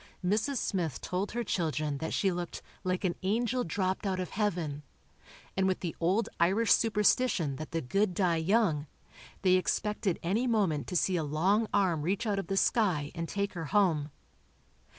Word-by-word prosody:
Mrs. 220 +9 +1
Smith 175 - -1
told 190 +4 -3
her 240 0 -1
children 155 -7 -1
that 160 - -3
she 195 - +1
looked 175 -1 -5 0.2
"like 185 +1 -1
an 180 -2 +1
angel 235 +6 0
dropped 185 +3 -1
out 190 -1 -1
of 180 - -4
Heaven," 175 -9 -1 0.7
and 190 0 +2
with 185 - 0
the 170 -3 -3
old 190 +7 +1
Irish 195 +7 +3
superstition 210 - +2
that 155 - -6
the 165 - -2
good 185 +8 0
die 175 -3 +2
young, 160 -4 +1 0.6
they 185 -1 +5
expected 205 0 -1
any 210 +9 +1
moment 185 - +1
to - - -5
see 180 +1 +2
a 160 - 0
long 185 +9 +1
arm 185 -6 +2
reach 185 +8 -1
out 205 -2 0
of 195 - -5
the 195 - -1
sky 180 -11 +2
and 165 -1 -4
take 200 0 -2
her 165 -3 -4
home. 155 -3 +2
185 Hz, 175 wpm, -30 LUFS, 165-205 Hz, 0.7 s, they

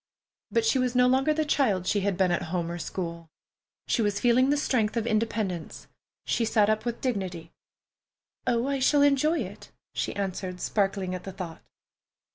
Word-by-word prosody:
But 460 - +1
she 275 -12 +3
was 250 -1 0
no 250 0 +5
longer 265 +4 +3
the 310 0 +1
child 225 -11 +1
she 205 - +1
had 195 -2 -1
been 190 -2 +3
at 175 - +1
home 170 -1 -2
or 175 - -5
school. 170 -2 -5 0.6
She - - +1
was 205 -1 0
feeling 250 +3 +4
the 290 - +3
strength 235 -6 0
of 230 - 0
independence. 215 -6 -2 0.4
She 235 - +1
sat 215 -2 +3
up 215 +2 -1
with 235 -1 -3
dignity. 185 -9 -3 1.0
"Oh, 235 0 +2
I 275 0 -1
shall 285 +2 +4
enjoy 285 +4 +3
it," - - -8 0.2
she - - -2
answered, 185 -2 -3
sparkling 195 -2 0
at 180 -1 -5
the 195 - -6
thought. 180 -3 -7
215 Hz, 180 wpm, -27 LUFS, 185-255 Hz, 1.0 s, no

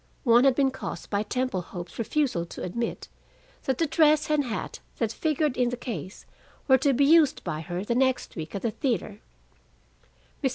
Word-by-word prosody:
One 240 +1 +5
had 270 -2 +5
been 270 -1 +2
caused 265 - -7
by 200 0 +1
Temple 250 -2 -1
Hope's 175 +2 -9
refusal 245 - 0
to - - -8
admit 235 +6 -3 0.6
that 265 -2 0
the 330 - +2
dress 305 0 +3
and 295 -2 +2
hat 225 -3 -4 0.2
that 230 -3 0
figured 300 +1 0
in 245 -1 +2
the 245 - -4
case 195 - -6 0.4
were 265 -2 +6
to 275 +2 +3
be 275 +2 +3
used 305 -1 +4
by 155 -3 -3
her 175 +2 -4
the 235 - 0
next 260 +1 +1
week 160 +2 -6
at 195 - -4
the 230 - 0
theater. 215 - -2 1.2
Mr. 265 - +3
245 Hz, 190 wpm, -26 LUFS, 205-280 Hz, 1.2 s, were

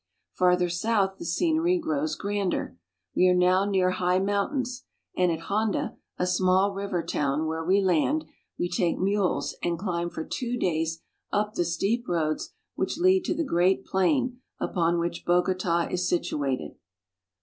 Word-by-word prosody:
Farther 180 0 +3
south 195 +2 0
the - - -6
scenery 340 +2 +2
grows 315 -2 -1
grander. 200 - -2 0.4
We 185 - +5
are 180 - +4
now 180 +2 +4
near 190 -2 +2
high 180 0 +1
mountains, 205 +6 -1 0.3
and 180 -1 +3
at 165 0 -3
Honda, 210 +3 -1 0.2
a 180 - 0
small 185 +2 +2
river 195 -3 -2
town, 145 +2 -1
where 160 +1 -2
we 190 +4 +3
land, 190 - +2 0.3
we 175 - 0
take 175 -1 0
mules 195 0 0
and 170 -1 -1
climb 175 -2 -2
for 160 - -6
two 245 -1 -3
days 165 -4 -1 0.3
up 210 +1 0
the 175 - +1
steep 200 +8 -1
roads 155 -3 -1 0.2
which - - -2
lead 370 +1 +3
to - - 0
the 330 - 0
great 185 - +2
plain 250 +6 +1 0.2
upon 170 -2 +1
which 170 0 -2
Bogota 175 -1 +1
is 180 0 0
situated. 140 -6 -1
185 Hz, 155 wpm, -27 LUFS, 175-210 Hz, 0.4 s, We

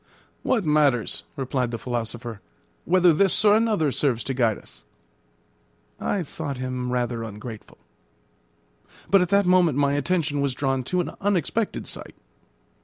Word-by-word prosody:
"What 230 -8 +1
matters," 145 -6 +2
replied 130 -2 -1
the 115 - -4
philosopher, 120 -2 -5 0.4
"whether 180 -1 +5
this 195 +5 +2
or 205 0 +7
another 215 -10 +2
serves 125 -4 0
to 135 - -3
guide 115 -5 +1
us?" - - -14 1.2
I 195 -3 -1
thought 140 -2 -5
him 125 -1 -3
rather 120 -2 -1
ungrateful. 110 0 -8 1.3
But 195 -1 +6
at 180 - 0
that 200 0 +3
moment 180 -5 +4
my 140 -1 +2
attention 145 0 0
was 140 -2 0
drawn 135 -1 0
to 180 +6 0
an - - -4
unexpected 205 +2 0
sight. - - -7
140 Hz, 140 wpm, -24 LUFS, 125-180 Hz, 1.3 s, or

